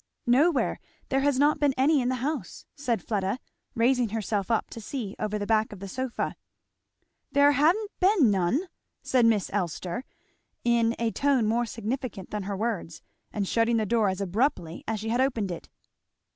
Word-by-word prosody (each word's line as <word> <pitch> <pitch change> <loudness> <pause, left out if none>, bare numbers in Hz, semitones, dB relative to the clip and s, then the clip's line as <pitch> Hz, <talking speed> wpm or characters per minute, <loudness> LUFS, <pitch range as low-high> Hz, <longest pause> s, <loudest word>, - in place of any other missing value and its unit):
"Nowhere 280 +6 +3 0.3
there 270 - +2
has 280 -1 +2
not 295 +2 +3
been 285 -2 +2
any 280 +2 +4
in 245 - 0
the 255 - 0
house," 285 - -4
said 245 -8 -2
Fleda, 200 0 -1 0.4
raising 245 0 +3
herself 210 -2 -2
up 225 - +1
to 230 - -7
see 220 -3 -5
over 215 0 -1
the 205 - -3
back 220 0 +2
of 205 - -9
her 195 - -6
sofa. 255 +4 -3 1.0
"There 285 +1 +6
ha'n't 345 - +2
been 365 - +4
none!" 195 - +1 0.4
said 250 -4 +3
Miss 210 -5 +1
Elster, 185 +3 -2 0.6
in 235 -1 +2
a 230 -1 0
tone 275 -4 +2
more 235 +2 +1
significant 225 -2 -4
than 210 - -2
her 200 - -2
words, 205 -7 -3 0.3
and 200 -2 -2
shutting 230 +2 +2
the 220 - +1
door 220 -2 +2
as 190 +1 -3
abruptly 195 - -1
as 220 -1 -1
she 220 +2 -4
had 240 +3 +2
opened 230 -8 0
it. 170 - -7
230 Hz, 175 wpm, -27 LUFS, 205-265 Hz, 1.0 s, There